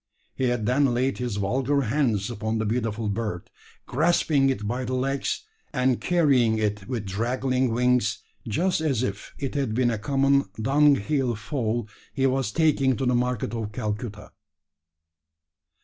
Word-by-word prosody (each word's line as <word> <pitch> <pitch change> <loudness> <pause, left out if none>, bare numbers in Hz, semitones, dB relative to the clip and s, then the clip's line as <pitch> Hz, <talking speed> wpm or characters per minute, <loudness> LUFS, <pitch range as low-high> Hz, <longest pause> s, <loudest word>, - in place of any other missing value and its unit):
He 130 - -1
had 120 -3 0
then 125 +1 +2
laid 130 +2 0
his 120 -4 -2
vulgar 130 +8 +1
hands 115 -5 0
upon 110 0 -2
the 110 - -1
beautiful 110 -1 -1
bird, 100 -4 -3 0.3
grasping 150 -2 +2
it 105 -6 -2
by 125 +4 -2
the 130 +1 -2
legs, 135 - -1 0.3
and 125 -2 +1
carrying 135 -10 +3
it 105 -2 -2
with 120 -5 -3
draggling 125 +6 0
wings 120 -2 +2 0.3
just 170 - 0
as 135 -7 0
if 100 -4 -5
it 135 -2 -4
had 135 -7 -1
been 120 -1 +2
a 110 - -2
common 140 +4 +2
dunghill 135 0 +2
fowl 115 -1 -2 0.3
he 135 -1 +1
was 130 -4 +1
taking 140 -4 +2
to 135 - -1
the 125 - +2
market 125 -3 -1
of 110 -2 -4
Calcutta. 105 -1 -4
125 Hz, 150 wpm, -25 LUFS, 110-135 Hz, 0.3 s, carrying